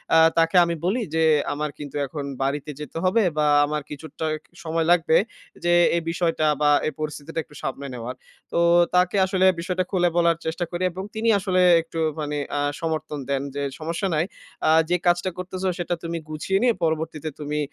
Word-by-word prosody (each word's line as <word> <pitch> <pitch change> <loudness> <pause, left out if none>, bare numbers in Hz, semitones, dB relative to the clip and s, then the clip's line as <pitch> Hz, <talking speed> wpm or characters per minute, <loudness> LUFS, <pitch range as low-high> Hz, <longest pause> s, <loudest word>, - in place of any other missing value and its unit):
আ - - +7 0.2
তাকে 165 +2 +3
আমি 170 - -2
বলি 225 +7 +1
যে, 160 - +3 0.3
"আমার 150 +1 -2
কিন্তু 145 -1 -8
এখন 145 +1 -6 0.2
বাড়িতে 145 +2 -2
যেতে 150 +1 -7
হবে 190 +5 +3 0.2
বা 150 - +3 0.2
আমার 150 0 -2
কিছুটা 160 +2 -6 0.4
সময় 165 0 -1
লাগবে 165 -2 +4 0.5
যে, 175 0 +3 0.2
এই 170 - +1
বিষয়টা 165 -2 0 0.2
বা 150 - +4 0.2
এই - - 0
পরিস্থিতিটা 155 +1 -4
একটু 150 - -19
সামলে 135 +1 -4
নেওয়ার।" 120 +1 -6 0.4
তো - - -1 0.4
তাকে 180 +2 +3
আসলে 190 0 +1
বিষয়টা 180 +1 -1
খুলে 175 -3 +2
বলার 170 -1 +3
চেষ্টা 165 +2 -2
করি 175 +1 -3
এবং 185 +2 -6
তিনি 225 +1 +1
আসলে 185 -1 +1 0.2
একটু 165 0 -7 0.2
মানে 150 0 -3 0.2
আ - - +1 0.2
সমর্থন 155 -2 -3
দেন 135 -1 0
যে, 140 - -2 0.2
"সমস্যা 165 +5 -2
নাই। 155 - +1 0.4
আ - - +5 0.2
যে, 180 - +3
কাজটা 175 +1 +2
করতেসো, 185 +1 -3
সেটা 175 0 -1
তুমি 170 0 -3
গুছিয়ে 155 +5 -1
নিয়ে 245 -2 +4
পরবর্তীতে 160 -1 -1
তুমি 150 0 -3
165 Hz, 185 wpm, -24 LUFS, 150-180 Hz, 0.5 s, আ